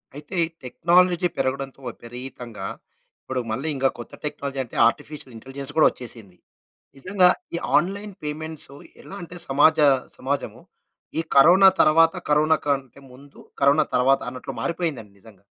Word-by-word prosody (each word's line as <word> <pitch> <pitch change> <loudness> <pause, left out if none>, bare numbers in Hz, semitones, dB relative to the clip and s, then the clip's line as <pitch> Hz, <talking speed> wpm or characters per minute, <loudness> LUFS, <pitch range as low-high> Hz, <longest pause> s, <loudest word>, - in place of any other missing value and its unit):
అయితే, 150 +5 -7 0.3
టెక్నాలజీ 175 +6 +3
పెరగడంతో 135 +1 -2
విపరీతంగా 120 0 -8 0.5
ఇప్పుడు, 130 -1 -3
మళ్ళీ 135 +8 -3
ఇంక 135 0 -2
కొత్త 120 - -10
టెక్నాలజీ 140 -2 -4
అంటే, 120 - -14
ఆర్టిఫిషియల్ 135 +1 -5
ఇంటెలిజెన్స్ 135 +4 -7
కూడా 155 - +7
వచ్చేసింది. 115 -7 -11 0.6
నిజంగా, 185 +4 +3 0.3
ఈ - - 0 0.2
ఆన్‌‌‌‌లైన్ 200 +3 -2
పేమెంట్సో 155 -1 -5 0.3
ఎలా 195 - -10
అంటే 175 +1 -9
సమాజ 145 +4 +4 0.4
సమాజము, 140 +2 -3 0.6
ఈ - - +2
కరోనా 180 +8 +8
తర్వాత, 165 +1 +5 0.2
కరోనా 155 +2 +4
కంటే 135 -2 -2
ముందు, 140 +3 -16 0.2
కరోనా 140 +3 +4
తర్వాత 135 +2 +4
అన్నట్లు 130 +1 -8
మారిపోయిందండి 155 - -3
నిజంగా. 100 -2 -19
140 Hz, 125 wpm, -23 LUFS, 130-160 Hz, 0.6 s, కరోనా